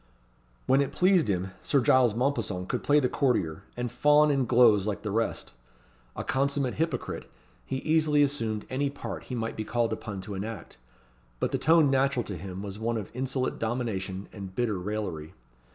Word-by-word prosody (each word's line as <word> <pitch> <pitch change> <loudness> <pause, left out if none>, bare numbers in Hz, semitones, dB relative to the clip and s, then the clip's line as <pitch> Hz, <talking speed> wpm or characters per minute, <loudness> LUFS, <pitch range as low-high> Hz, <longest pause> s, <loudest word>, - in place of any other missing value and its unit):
When 135 +2 +4
it 140 - -1
pleased 180 - +3
him, 95 -1 -1
Sir 140 - +2
Giles 125 -2 +4
Mompesson 115 -8 -1
could - - -2
play 145 +1 +4
the 130 - +2
courtier, 100 - 0 0.2
and 120 -1 -2
fawn 150 +3 +4
and 135 -3 +1
gloze 115 -5 +5
like 105 - -3
the 105 - -3
rest. 115 +2 -2 0.6
A - - -4
consummate 140 -1 0
hypocrite, 165 +1 -3 0.4
he 135 - -2
easily 155 -2 +3
assumed 115 -7 -1
any 140 +2 0
part 140 - -7
he 125 - -5
might 115 -1 -3
be 110 - -3
called 115 +1 0
upon 110 -3 -6
to 100 +2 -7
enact; 105 +3 -6 0.6
but - - 0
the - - 0
tone 160 -2 +5
natural 135 -2 +2
to 100 - -6
him 95 +2 -7
was 100 0 -6
one 115 +1 -1
of 105 -4 -6
insolent 130 0 -2
domination 105 -5 -3
and 95 -3 -8
bitter 110 -6 0
raillery. 90 -6 -4
120 Hz, 180 wpm, -28 LUFS, 105-135 Hz, 0.6 s, gloze